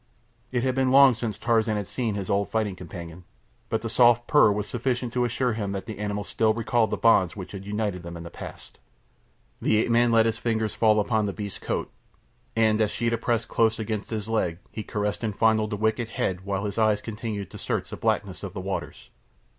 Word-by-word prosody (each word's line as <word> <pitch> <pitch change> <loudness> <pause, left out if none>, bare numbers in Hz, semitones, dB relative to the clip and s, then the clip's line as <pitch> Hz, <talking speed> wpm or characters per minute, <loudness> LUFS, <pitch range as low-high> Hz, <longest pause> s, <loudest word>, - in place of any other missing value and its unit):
It 125 -2 0
had 130 -1 +1
been 130 0 +2
long 135 0 +7
since 115 -2 -4
Tarzan 115 -2 +1
had 105 - -2
seen 115 0 -2
his 100 -2 -4
old 100 0 0
fighting 110 -4 -1
companion, 85 -1 -9 0.5
but 110 0 -1
the - - -2
soft 120 0 +4
purr 145 -7 +5
was 105 0 -1
sufficient 120 0 -2
to 125 -1 +2
assure 120 +1 0
him 100 -3 -3
that 95 -1 -4
the 110 -2 -7
animal 105 0 -2
still 110 +1 +1
recalled 115 -1 +1
the - - -1
bonds 100 -6 +4
which 95 -3 -7
had 100 0 -8
united 105 -3 -2
them 85 0 -7
in 85 - -8
the 85 - -9
past. - - -10 0.8
The 110 - +3
ape 115 +2 +1
man 120 0 +4
let 115 -1 +5
his 115 0 0
fingers 110 -2 -1
fall 110 -1 +4
upon 105 0 +1
the 100 - -3
beast's 100 -1 -6
coat, - - -3 0.6
and 110 -1 +3
as 105 - +3
Sheeta 115 +1 -1
pressed 115 -1 0
close 115 0 +2
against 110 -1 -3
his 110 -2 -3
leg 110 -7 0
he 110 - -5
caressed 105 +1 -3
and 105 -3 -2
fondled 110 -1 +3
the 105 - -3
wicked 110 +2 0
head 95 -3 -2
while 100 0 -2
his 100 +2 -3
eyes 110 -2 +3
continued 105 -3 -5
to - - -9
search - - -3
the - - -4
blackness - - -1
of - - -6
the - - -5
waters. - - -5
110 Hz, 220 wpm, -26 LUFS, 100-115 Hz, 0.8 s, long